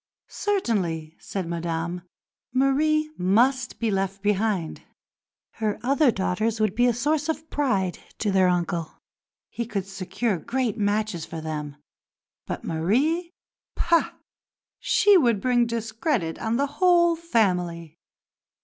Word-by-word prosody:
Certainly, 185 - -1
said 190 -4 -4
Madame, 170 +1 -3 0.5
Marie 305 +4 +2
must 240 +7 +2
be 230 -2 0
left 195 0 -2
behind. 205 -4 0 0.8
Her 215 -2 -1
other 275 +3 +3
daughters 215 +2 0
would 215 -3 +1
be 245 +3 +3
a - - +4
source 295 +6 0
of 320 0 -3
pride 200 -11 0 0.2
to 210 - 0
their 190 -1 +4
uncle; 175 -2 -1 0.5
he 235 -1 -4
could 200 -5 -3
secure 195 +1 -2
great 240 - -1
matches 205 -4 -1
for 165 - -6
them, 150 -2 -5 0.7
but - - -4
Marie 275 - 0 0.4
pah! 340 -1 +2 0.7
she 410 -2 +5
would 235 -8 +2
bring 240 +1 +2
discredit 225 - -2
on 225 0 -1
the 280 - +2 0.2
whole 345 -2 +5
family. 180 - -1
215 Hz, 120 wpm, -25 LUFS, 180-265 Hz, 0.8 s, she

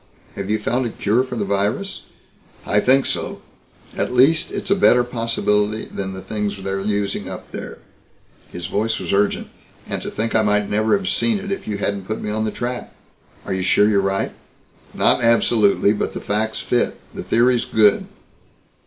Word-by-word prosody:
Have 100 0 -5
you 110 - +2
found 120 +4 -1
a - - -3
cure 110 +3 +1
for 130 -1 -6
the 105 -3 -1
virus?" 100 - -1 0.6
"I 105 - +2
think 135 +4 +4
so. - - -2 0.6
At - - -1
least 135 +6 +4
it's 195 - -4
a - - +6
better 125 -11 +5
possibility 110 -3 0
than 95 -1 -5
the 95 -1 -8
things 105 0 -3
they're 95 0 -3
using 100 0 -2
up - - -9
there." - - -7 0.7
His 90 -1 -6
voice 110 +5 -1
was - - -3
urgent. 100 +1 +1 0.4
"And - - -3
to - - -4
think 115 +1 -2
I 110 - +4
might 105 -1 +2
never 110 - +2
have 195 -1 -6
seen 225 +1 +1
it 200 0 -6
if 195 - -4
you 105 -2 -2
hadn't 100 -1 -2
put 110 - -3
me 105 - -4
on 110 +1 -1
the - - 0
track." 125 0 -5 0.5
"Are - - -2
you 95 - -1
sure 100 +2 +4
you're 100 -2 +3
right?" 95 0 -1 0.6
"Not - - +3
absolutely, 110 -3 +4
but 105 - -2
the - - -4
facts 110 +2 -1
fit. 120 - 0
The - - -6
theory's 120 +1 +2
good." 105 -2 +3
110 Hz, 190 wpm, -21 LUFS, 100-120 Hz, 0.7 s, a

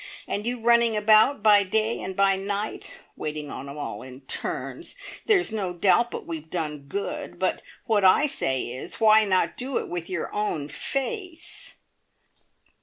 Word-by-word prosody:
And 205 +3 -3
you 245 0 -2
running 235 -1 +4
about 215 +4 +5
by 210 -2 +7
day 220 +4 0
and 185 0 -5
by 195 0 +4
night, 200 +2 -3 0.3
waiting 150 -1 -5
on 140 +1 -7
'em 140 - -8
all 105 -8 -5
in 130 +1 -11
turns. 130 - -4 0.3
There's 385 - +3
no 195 -5 -2
doubt 200 +7 +3
but - - -6
we've 160 -1 -6
done 150 -5 -4
good, 200 +5 -4
but - - 0 0.2
what 215 -4 +2
I 190 +11 +6
say 130 - 0
is 125 +2 -6
why 220 -1 +6
not 185 -2 +1
do 255 +1 -2
it - - -3
with 175 0 -5
your 185 -4 -4
own 170 -9 -1
face?" 330 - -3
200 Hz, 165 wpm, -25 LUFS, 160-225 Hz, 0.3 s, by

